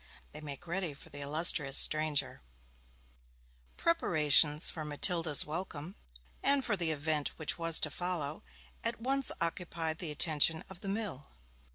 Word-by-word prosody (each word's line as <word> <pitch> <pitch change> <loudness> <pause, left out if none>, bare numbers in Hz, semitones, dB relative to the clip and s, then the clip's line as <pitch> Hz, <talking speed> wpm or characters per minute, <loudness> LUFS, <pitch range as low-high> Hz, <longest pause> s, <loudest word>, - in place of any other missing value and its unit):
THEY 150 - -9
MAKE 145 +2 -11
READY 175 -3 -3
FOR 160 - -14
THE 145 - -9
ILLUSTRIOUS 150 -1 +4
STRANGER 155 -1 +1 1.4
Preparations 155 - +3
for 160 - -8
Matilda's 155 +1 0
welcome, 160 +1 -6 0.5
and 280 -1 +1
for 215 - -1
the 170 -4 -2
event 155 -1 -2
which 155 +2 -3
was 165 -1 +4
to 155 - +1
follow, 165 -3 -4 0.4
at 230 -1 -4
once 270 +2 +4
occupied 165 -1 -4
the 170 - -3
attention 155 +1 +3
of 185 - -12
the 195 - -7
mill. 195 -9 -5
160 Hz, 140 wpm, -30 LUFS, 150-180 Hz, 1.4 s, ILLUSTRIOUS